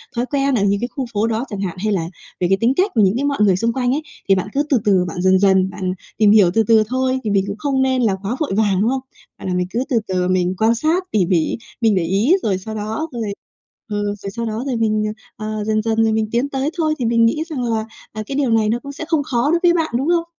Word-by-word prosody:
thói 240 +1 0
quen 275 0 0
ở 205 - +1
những 200 0 +2
cái 240 - -1
khu 270 - -2
phố 210 +2 +1
đó 230 +2 -1
chẳng 200 -2 -5
hạn 185 -2 -3
hay 215 -1 +1
là 170 -4 -1 0.3
về 175 - +1
cái 195 - +3
tính 240 +3 +3
cách 385 +2 +2
những 205 -2 +4
cái 280 - -1
mọi 285 -1 0
người 200 -3 +4
xung 230 +5 0
quanh 250 -2 0
ấy. 290 +4 0 0.3
Thì 195 - +6
bạn 185 +1 -2
cứ 285 - +1
từ 270 - +4
từ, 190 -3 +3
bạn 175 +1 -4
dần 190 0 +4
dần, 190 -1 +3
bạn 185 -2 -3 0.2
tìm 210 -1 +5
hiểu 205 -5 +6
từ 225 - +3
từ 225 -1 +5
thôi, 260 +1 0
thì 215 - -2
mình 200 -1 +2
cũng 200 - -4
không 270 +2 0
nên 260 -1 +1
là 215 -5 +2
quá 210 +5 -2
vội 305 - -1
vàng, 200 -3 +2
đúng 220 - +2
không? 265 0 -1 0.4
Và - - -9
là 185 - -1
mình 180 0 0
cứ 235 +6 -1
từ 240 -5 +2
từ 180 -1 0
mình 185 0 +1
quan 225 +3 +3
sát 320 +9 +1
tỉ 200 -4 +2
mỉ, 170 -3 +1 0.2
mình 220 -3 +3
để 180 - +1
ý 200 - +2
rồi 195 -4 +1
sau 220 +4 -7
đó 220 +9 -3
rồi 235 - -5 0.7
ừm, 205 -1 -2
rồi 200 0 -6
sau 230 +4 -4
đó 220 +2 -3
rồi 260 -3 -1
mình, 215 -2 +1 0.3
ờ, 215 - -6
ờ, 210 - -3
dần 215 0 0
dần 225 0 +1
rồi 220 - +2
mình 220 0 0
tiến 245 +4 +1
tới 270 +1 -1
thôi, 310 -2 +1
thì 245 - -2
mình 230 0 +3
nghĩ 305 +7 0
rằng 270 -5 -3
là, 225 -2 -1 0.3
ờ, 215 0 -5
cái 275 - -5
điều 275 -4 +1
này 220 -1 +3
nó 230 +2 +1
cũng 280 - -7
sẽ 300 - -6
không 320 -3 +2
khó 250 +1 0
đối 340 +1 +2
với 345 -1 +5
bạn, 325 -7 -1
đúng 275 - -2
không? 340 -1 +2
225 Hz, 295 wpm, -19 LUFS, 200-260 Hz, 0.7 s, Thì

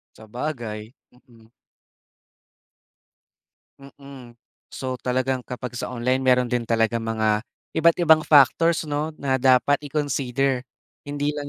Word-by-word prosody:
Sabagay, 115 -1 -6 0.2
mm. 115 -3 -23 2.3
Mm, 135 -3 -14 0.3
so 130 -1 -5
talagang 130 +1 -1
kapag 125 0 -7
sa - - -4
online, 125 +1 -1
meron 125 -1 +2
din 120 -1 -1
talagang 115 0 +1
mga 110 -1 0 0.3
iba't-ibang 160 -1 +4
factors 155 +3 +4
‘no, 150 0 -2
na 130 -3 -1
dapat 130 +2 +3
i-consider. 135 -2 -1 0.5
Hindi 145 +1 -2
lang 145 -1 -6
130 Hz, 105 wpm, -23 LUFS, 120-145 Hz, 2.3 s, iba't-ibang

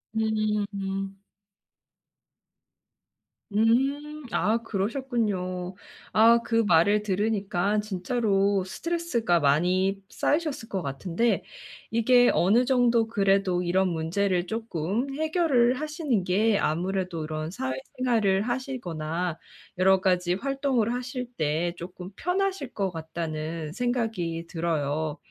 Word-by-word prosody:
음음. 205 -3 -1 2.4
음. 275 +7 +1
아 225 +2 +2
그러셨군요. 200 -5 -2 0.4
아 230 +2 +6
그 230 -1 +2
말을 200 +5 +4
들으니까 205 0 0
진짜로 200 -1 +1
스트레스가 235 - 0
많이 185 +7 +2
쌓이셨을 295 -6 -1
것 190 -2 -2
같은데 170 - -1 0.5
이게 245 +2 +4
어느 215 +8 +4
정도 240 -3 +3
그래도 195 -4 +2
이런 185 +1 +1
문제를 175 +2 0
조금 225 - -2
해결을 310 -6 +2
하시는 300 - -1
게 205 +4 +2
아무래도 180 0 -1
이런 155 +1 -4
사회생활을 195 - 0
하시거나 180 - -3 0.4
여러가지 185 -1 +3
활동을 265 -1 0
하실 250 0 -4
때 160 +3 0
조금 180 +2 -8
편하실 370 -6 -1
것 195 -3 -1
같다는 160 -1 -5
생각이 220 -9 -2
들어요. 155 -2 -1
200 Hz, 230 characters per minute, -26 LUFS, 175-240 Hz, 2.4 s, 아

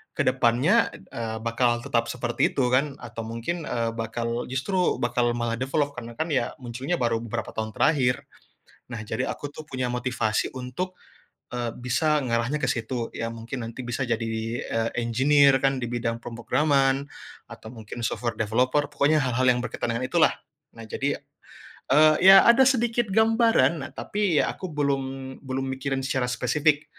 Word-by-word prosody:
ke - - +1
depannya, 135 - +3 0.2
eee, 110 -1 -4
bakalan 120 +1 +1
tetap 115 -1 0
seperti 120 -1 0
itu, 130 -3 +2
kan, 135 +2 +2
atau 115 -1 -6
mungkin, 115 +10 -4
eee, 115 -1 -1
bakal 115 +1 -3
justru 180 +8 0
bakal 120 0 +1
malah 120 -1 -1
develop 140 +2 0
karena, 120 -1 -7
kan, 160 +2 -2
ya, 125 -4 0
munculnya 130 +8 -3
baru 115 -2 +1
beberapa 115 - -4
tahun 110 0 -3
terakhir. 130 -5 +2 0.7
Nah, 115 - -4
jadi 125 +3 -2
aku, 145 - -5
tuh, 155 - -9
punya 130 -1 -2
motivasi 125 -3 -1
untuk, 130 +9 -5 0.6
eee, 120 -1 -2
bisa 150 +5 +1
ngarahnya 120 +5 -1
ke - - 0
situ. 115 0 -2
Ya, 115 - -3
mungkin 115 +3 -6
nanti 115 +3 -7
bisa 120 +3 -2
jadi, 115 -1 -1 0.4
eee, 115 0 -1
engineer, 135 +4 +4
kan, 135 0 +2
di 120 - -2
bidang 115 -1 -2
pemrograman 135 +3 +1 0.4
atau 110 - -10
mungkin 115 +1 -8
software 115 -1 -2
developer 125 +6 +1
pokoknya 145 +1 +2
hal-hal 130 0 +1
yang 125 0 +3
berkaitan 120 - -3
dengan 125 - -2
itulah. 160 +4 +3 0.4
Nah, 115 - -9
jadi, 140 +6 -2 0.7
eee, 155 +2 +6
ya, 195 0 +10
ada 235 +3 +7
sedikit 240 -3 +1
gambaran, 220 - +3
nah, - - -8
tapi, 200 -4 0
ya, - - -1
aku 185 - -7
belum, 140 -2 0 0.4
belum 135 -1 -3
mikirin 135 0 -2
secara 130 -2 -1
spesifik. 145 +5 +1
130 Hz, 160 wpm, -25 LUFS, 115-145 Hz, 0.7 s, ya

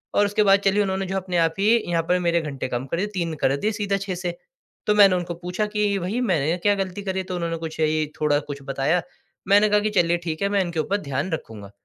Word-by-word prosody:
और 205 - +4
उसके 205 +1 +2
बाद 195 0 +5
चलिए 200 +1 +3
उन्होंने 190 0 -2
जो 195 +1 -2
अपने 185 -2 -2
आप 165 -1 +2
ही 200 - +2 0.2
यहाँ 165 -1 +1
पर 180 0 +3
मेरे 170 -1 +1
घंटे 140 -4 -4
कम 125 +2 -3
कर 170 - -2
दिए, 205 - 0
3 170 -4 -2
कर 135 - +3
दिए 210 +9 0
सीधा 205 -2 -1
6 195 -1 -4
से। 175 -1 -4 0.5
तो 210 - +3
मैंने 200 -3 +7
उनको 175 -1 -3
पूछा 180 +4 -3
कि, 210 -1 0
"भई, 190 +7 -2
मैंने 170 - +1
क्या 205 0 +4
ग़लती 195 0 -3
करी 190 -1 -2
है?" 190 - -2
तो 185 -1 -4
उन्होंने 170 -1 -2
कुछ 160 -1 -7
यही 155 0 +2 0.2
थोड़ा 145 -1 +3
कुछ 140 0 -7
बताया। 140 +5 0 0.5
मैंने 205 +1 +5
कहा 210 0 +4
कि, 215 - 0
"चलिए 175 -3 +2
ठीक 160 0 -3
है, 200 - +1
मैं 200 -1 +2
इनके 170 -3 -3
ऊपर 200 +6 0
ध्यान 140 +4 -3
रखूँगा।" 105 -10 -6
180 Hz, 260 wpm, -23 LUFS, 160-200 Hz, 0.5 s, मैंने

